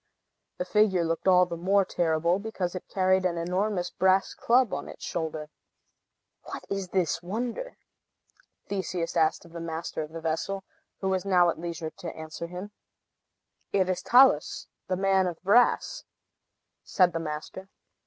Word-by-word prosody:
The 180 Hz, -, -2 dB
figure 190 Hz, -4 st, +3 dB
looked 165 Hz, +3 st, -2 dB
all 180 Hz, -1 st, +6 dB
the 175 Hz, -, -5 dB
more 190 Hz, +3 st, +2 dB
terrible 170 Hz, 0 st, +1 dB
because 200 Hz, -4 st, -3 dB
it 185 Hz, -, -7 dB
carried 190 Hz, 0 st, +2 dB
an 175 Hz, -2 st, 0 dB
enormous 180 Hz, +2 st, -1 dB
brass 190 Hz, +1 st, +2 dB
club 245 Hz, -1 st, +2 dB
on 145 Hz, -, -4 dB
its -, -, -9 dB
shoulder. 155 Hz, -2 st, -4 dB, 0.9 s
"What -, -, -7 dB
is 195 Hz, -1 st, -2 dB
this 175 Hz, -3 st, 0 dB
wonder?" 235 Hz, -, -4 dB, 0.9 s
Theseus 185 Hz, -4 st, -3 dB
asked 160 Hz, 0 st, +2 dB
of 170 Hz, -, -15 dB
the 170 Hz, -, -7 dB
master 165 Hz, -1 st, -4 dB
of 155 Hz, 0 st, -6 dB
the 165 Hz, -, -6 dB
vessel, 165 Hz, +5 st, -2 dB, 0.4 s
who 190 Hz, -, 0 dB
was 190 Hz, -1 st, 0 dB
now 180 Hz, -3 st, +4 dB
at -, -, -9 dB
leisure 165 Hz, -1 st, -5 dB
to 170 Hz, -, -7 dB
answer 160 Hz, +1 st, -6 dB
him. 180 Hz, +4 st, -7 dB, 1.0 s
"It 190 Hz, -2 st, +2 dB
is 185 Hz, -, -1 dB
Talus, 260 Hz, +2 st, +4 dB, 0.2 s
the 185 Hz, -, -1 dB
Man 190 Hz, -1 st, +3 dB
of 170 Hz, -2 st, -5 dB
Brass," 240 Hz, -, +3 dB, 0.8 s
said 180 Hz, -2 st, +3 dB
the 165 Hz, -, -1 dB
master. 165 Hz, +4 st, -6 dB
180 Hz, 155 wpm, -27 LUFS, 165-195 Hz, 1.0 s, all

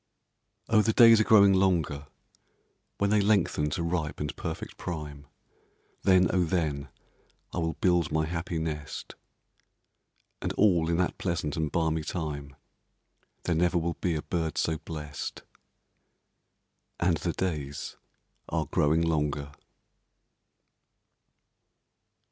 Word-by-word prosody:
Oh, 110 Hz, -1 st, +4 dB
the 110 Hz, +1 st, +1 dB
days 115 Hz, -2 st, +8 dB
are -, -, +4 dB
growing 100 Hz, -3 st, +6 dB
longer; 85 Hz, -7 st, +1 dB, 0.9 s
When 100 Hz, 0 st, +1 dB
they 105 Hz, -1 st, +4 dB
lengthen 100 Hz, -7 st, +2 dB
to 85 Hz, -, -2 dB
ripe 85 Hz, -3 st, -2 dB
and 75 Hz, -1 st, -3 dB
perfect -, -, -6 dB
prime, 75 Hz, -5 st, -6 dB, 0.7 s
Then, 95 Hz, -2 st, +5 dB
oh, 90 Hz, -1 st, +3 dB
then, 75 Hz, -5 st, -1 dB, 0.6 s
I -, -, -2 dB
will 80 Hz, -1 st, -1 dB
build 90 Hz, -4 st, +2 dB
my 80 Hz, 0 st, +1 dB
happy 85 Hz, +1 st, -3 dB
nest; 75 Hz, -2 st, -5 dB, 1.3 s
And -, -, -2 dB
all 85 Hz, -6 st, +3 dB
in 85 Hz, -, +1 dB
that 90 Hz, 0 st, -1 dB
pleasant 85 Hz, -5 st, -2 dB
and 80 Hz, -2 st, -1 dB
balmy 80 Hz, -2 st, 0 dB
time, 75 Hz, -4 st, -5 dB, 0.9 s
There 90 Hz, -, 0 dB
never 90 Hz, +2 st, +2 dB
will 85 Hz, 0 st, 0 dB
be 85 Hz, -1 st, -2 dB
a 75 Hz, -, -3 dB
bird 80 Hz, -3 st, -2 dB
so 80 Hz, -1 st, 0 dB
blest; 75 Hz, -3 st, -6 dB, 1.6 s
And 85 Hz, -1 st, +2 dB
the 85 Hz, -, -2 dB
days 75 Hz, -6 st, -3 dB, 0.5 s
are -, -, -1 dB
growing 80 Hz, +3 st, +2 dB
longer. 75 Hz, -3 st, -1 dB
80 Hz, 120 wpm, -28 LUFS, 75-90 Hz, 1.6 s, days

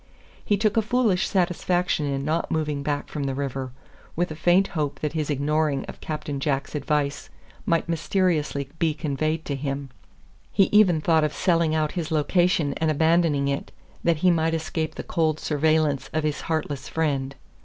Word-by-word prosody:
He 205 Hz, -, +1 dB
took 215 Hz, +1 st, +1 dB
a -, -, +5 dB
foolish 220 Hz, -4 st, +1 dB
satisfaction 180 Hz, -4 st, 0 dB
in 140 Hz, 0 st, -2 dB
not 160 Hz, +2 st, 0 dB
moving 150 Hz, -2 st, -1 dB
back 145 Hz, 0 st, -2 dB
from 145 Hz, -2 st, -4 dB
the 135 Hz, -1 st, -2 dB
river, 135 Hz, -2 st, -3 dB, 0.4 s
with 175 Hz, 0 st, 0 dB
a -, -, -5 dB
faint 175 Hz, +4 st, +3 dB
hope 150 Hz, -4 st, -2 dB
that 150 Hz, -1 st, -2 dB
his 155 Hz, -2 st, -2 dB
ignoring 150 Hz, 0 st, 0 dB
of -, -, -10 dB
Captain 150 Hz, -2 st, -4 dB
Jack's 140 Hz, 0 st, -1 dB
advice 145 Hz, -1 st, -1 dB, 0.4 s
might 165 Hz, -1 st, +1 dB
mysteriously 165 Hz, -4 st, 0 dB
be 160 Hz, -2 st, +1 dB
conveyed 155 Hz, +1 st, -2 dB
to 140 Hz, -, -2 dB
him. 135 Hz, -1 st, -4 dB, 0.6 s
He 195 Hz, -, +3 dB
even 190 Hz, -7 st, +5 dB
thought 160 Hz, 0 st, +3 dB
of 150 Hz, -1 st, 0 dB
selling 170 Hz, -4 st, +2 dB
out 155 Hz, -1 st, +1 dB
his 170 Hz, -4 st, -3 dB
location 160 Hz, -1 st, +2 dB
and 160 Hz, -, +1 dB
abandoning 160 Hz, -2 st, +2 dB
it, 140 Hz, 0 st, -2 dB, 0.3 s
that 170 Hz, -2 st, +3 dB
he 180 Hz, -, +7 dB
might 165 Hz, -1 st, +1 dB
escape 160 Hz, 0 st, -3 dB
the -, -, -5 dB
cold 155 Hz, -2 st, 0 dB
surveillance 155 Hz, -2 st, +1 dB
of 155 Hz, 0 st, 0 dB
his 150 Hz, -1 st, -1 dB
heartless 150 Hz, -4 st, -3 dB
friend. 140 Hz, -4 st, -1 dB
155 Hz, 175 wpm, -25 LUFS, 145-170 Hz, 0.6 s, he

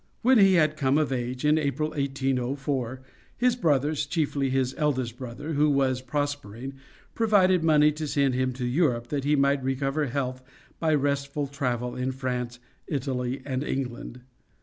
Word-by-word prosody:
When 255 Hz, 0 st, +6 dB
he 195 Hz, -2 st, +6 dB
had 155 Hz, -2 st, +3 dB
come 135 Hz, 0 st, +2 dB
of 155 Hz, -3 st, +1 dB
age, 125 Hz, +1 st, -3 dB
in 150 Hz, +1 st, +4 dB
April, 155 Hz, +1 st, -1 dB
1804, 135 Hz, -2 st, -2 dB, 0.3 s
his 250 Hz, 0 st, +3 dB
brothers, 150 Hz, -, +1 dB
chiefly 145 Hz, -3 st, 0 dB
his 130 Hz, -1 st, 0 dB
eldest 130 Hz, -6 st, -1 dB
brother, 130 Hz, +5 st, -6 dB
who 150 Hz, +1 st, +3 dB
was 135 Hz, -2 st, +1 dB
prospering, 135 Hz, -2 st, -4 dB, 0.4 s
provided 190 Hz, -6 st, +3 dB
money 150 Hz, -2 st, +5 dB
to 155 Hz, +1 st, -4 dB
send 140 Hz, -3 st, +1 dB
him 130 Hz, +1 st, 0 dB
to 125 Hz, 0 st, -4 dB
Europe 120 Hz, -3 st, +1 dB
that 140 Hz, -2 st, -2 dB
he 150 Hz, +1 st, +3 dB
might 140 Hz, -1 st, +2 dB
recover 135 Hz, +3 st, 0 dB
health 130 Hz, 0 st, -3 dB, 0.4 s
by 160 Hz, -2 st, +2 dB
restful 140 Hz, 0 st, -1 dB
travel 125 Hz, -4 st, -2 dB
in 130 Hz, +1 st, -1 dB
France, 125 Hz, -2 st, -3 dB, 0.3 s
Italy 130 Hz, -2 st, -2 dB
and 130 Hz, -1 st, -2 dB
England. 125 Hz, -3 st, -4 dB
140 Hz, 155 wpm, -26 LUFS, 130-150 Hz, 0.4 s, When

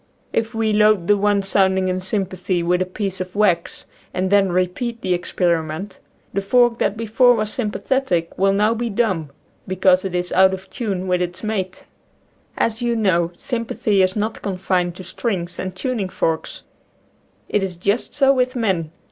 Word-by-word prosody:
If 225 Hz, 0 st, -1 dB
we 220 Hz, -1 st, +1 dB
load 210 Hz, -3 st, +4 dB
the 205 Hz, -, +4 dB
one 205 Hz, 0 st, +2 dB
sounding 190 Hz, -1 st, +2 dB
in 185 Hz, 0 st, -1 dB
sympathy, 185 Hz, -2 st, -2 dB
with 180 Hz, +1 st, +1 dB
a 185 Hz, -, 0 dB
piece 190 Hz, 0 st, -4 dB
of 185 Hz, +1 st, -6 dB
wax, 180 Hz, -5 st, +1 dB, 0.3 s
and 185 Hz, +1 st, -1 dB
then 200 Hz, -2 st, +4 dB
repeat 185 Hz, +7 st, -1 dB
the 185 Hz, -, 0 dB
experiment, 175 Hz, +1 st, -1 dB, 0.3 s
the 200 Hz, -, 0 dB
fork 240 Hz, +3 st, +3 dB
that 210 Hz, -, 0 dB
before 230 Hz, +3 st, +4 dB
was 215 Hz, -1 st, -2 dB
sympathetic 220 Hz, -, -1 dB
will 195 Hz, +1 st, +3 dB
now 210 Hz, +3 st, +2 dB
be 235 Hz, +1 st, -2 dB
dumb, 195 Hz, -8 st, 0 dB, 0.4 s
because 185 Hz, 0 st, +3 dB
it 190 Hz, -2 st, -3 dB
is 180 Hz, 0 st, -2 dB
out 190 Hz, +1 st, +5 dB
of 190 Hz, 0 st, -14 dB
tune 195 Hz, -6 st, -3 dB
with 180 Hz, -1 st, +1 dB
its 180 Hz, +1 st, -4 dB
mate. 190 Hz, -4 st, -3 dB, 0.7 s
As 230 Hz, +1 st, 0 dB
you 240 Hz, -1 st, +1 dB
know, 175 Hz, -6 st, +2 dB
sympathy 230 Hz, -4 st, 0 dB
is 185 Hz, 0 st, +2 dB
not 215 Hz, +1 st, -2 dB
confined 180 Hz, -2 st, -1 dB
to 185 Hz, -, -9 dB
strings 180 Hz, -3 st, -3 dB
and 185 Hz, -1 st, -4 dB
tuning 220 Hz, -2 st, -2 dB
forks. 160 Hz, -3 st, -2 dB, 0.8 s
It 210 Hz, -, 0 dB
is 190 Hz, -2 st, -3 dB
just 200 Hz, +6 st, -1 dB
so 275 Hz, -1 st, +5 dB
with 255 Hz, 0 st, 0 dB
men. 190 Hz, -9 st, 0 dB
195 Hz, 175 wpm, -21 LUFS, 180-220 Hz, 0.8 s, out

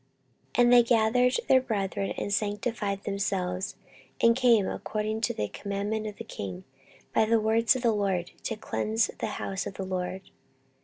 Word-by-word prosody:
14:029:015 -, -, 0 dB
And 240 Hz, 0 st, +5 dB
they 245 Hz, -, +9 dB
gathered 235 Hz, +2 st, +3 dB
their 260 Hz, -1 st, +6 dB
brethren, 200 Hz, -5 st, -2 dB
and 205 Hz, -, -2 dB
sanctified 205 Hz, -1 st, -1 dB
themselves, 195 Hz, -2 st, -2 dB, 0.4 s
and 230 Hz, 0 st, +5 dB
came, 235 Hz, -6 st, +4 dB
according 215 Hz, +1 st, -3 dB
to 220 Hz, -, +1 dB
the 105 Hz, -, -1 dB
commandment 205 Hz, -, -3 dB
of 210 Hz, -, -6 dB
the 230 Hz, -, -7 dB
king, 95 Hz, -, -6 dB, 0.5 s
by -, -, +4 dB
the 225 Hz, +1 st, +3 dB
words 225 Hz, +2 st, +3 dB
of 255 Hz, -, -4 dB
the 235 Hz, -, +4 dB
LORD, 190 Hz, -4 st, -1 dB
to 225 Hz, -, -1 dB
cleanse 220 Hz, 0 st, -1 dB
the -, -, -1 dB
house 190 Hz, 0 st, -3 dB
of 200 Hz, -, -7 dB
the 190 Hz, -, -4 dB
LORD. 185 Hz, 0 st, -4 dB
210 Hz, 170 wpm, -28 LUFS, 195-230 Hz, 0.5 s, they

